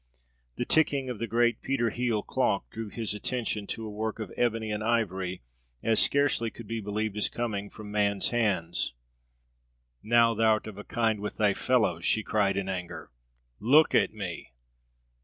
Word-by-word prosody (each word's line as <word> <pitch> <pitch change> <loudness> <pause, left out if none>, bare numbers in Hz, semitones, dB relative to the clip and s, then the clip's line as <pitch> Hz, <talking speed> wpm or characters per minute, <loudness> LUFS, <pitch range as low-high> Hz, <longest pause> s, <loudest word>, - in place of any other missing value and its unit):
The 120 - -2
ticking 140 -4 +3
of 115 - -6
the 115 - -2
great 120 +1 +2
Peter 120 -4 0
Hele 120 -3 -1
clock - - 0
drew 110 -1 -6
his 110 -1 -3
attention 105 -1 -2
to 115 - -4
a - - -5
work 110 +1 -3
of 110 -4 -6
ebony 115 -2 0
and 105 0 -2
ivory 95 - -1 0.4
as 115 -1 +3
scarcely 140 -5 +2
could 115 - -11
be 115 +1 -4
believed 105 +1 -2
as 105 - +2
coming 105 -4 -3
from 105 -1 -10
man's 100 -1 +2
hands. 100 - 0 1.1
"Now 115 0 +4
thou'rt 110 -1 +2
of 105 -2 -8
a - - -7
kind 110 -2 0
with 105 +1 -5
thy 105 -2 +3
fellows!" 105 -9 +1
she 110 - +2
cried 100 -3 +1
in 100 -1 -2
anger. 90 -6 -5 0.5
"Look 145 +8 +5
at - - +3
me! 95 -10 -7
110 Hz, 170 wpm, -28 LUFS, 100-115 Hz, 1.1 s, Look